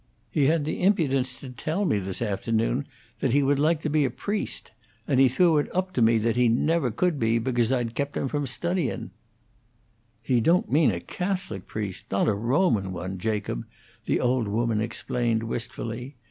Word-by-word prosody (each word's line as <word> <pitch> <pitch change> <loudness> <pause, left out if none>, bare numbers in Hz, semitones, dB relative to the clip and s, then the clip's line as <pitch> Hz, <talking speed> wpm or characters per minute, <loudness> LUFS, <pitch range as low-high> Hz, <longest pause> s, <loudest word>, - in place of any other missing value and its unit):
He 140 -3 +3
had 155 -1 +2
the 155 - -3
impudence 135 -10 +2
to 130 - -8
tell 155 - -2
me 125 - +2
this 95 +3 -3
afternoon 115 +5 0 0.3
that 130 - +1
he 140 0 +4
would 140 +1 +2
like 155 +1 +2
to - - 0
be 150 0 +3
a 135 - +1
priest; 205 - -3 0.4
and 135 -3 +2
he 135 -1 +6
threw 160 +4 +4
it 145 - -2
up 185 0 -1
to 125 - 0
me 115 0 +5
that 110 +1 +1
he 125 -1 +4
never 150 +4 +2
could 155 +6 0
be 115 0 +2
because 120 0 +1
I'd 120 -3 0
kept 140 +3 -2
him - - -1
from 145 0 -2
studyin'." 170 +2 -2 1.1
"He 120 0 +2
don't 170 +9 +2
mean 155 +1 +5
a 90 -5 -1
Catholic 180 - -4
priest 105 -4 -5
not 100 - +2
a 110 - +3
Roman 115 - +1
one, 95 +1 -5
Jacob," 105 - -2 0.4
the - - +1
old 125 -2 +1
woman 110 +1 0
explained, 115 0 -1
wistfully. 120 +2 -5
125 Hz, 190 wpm, -26 LUFS, 115-150 Hz, 1.1 s, he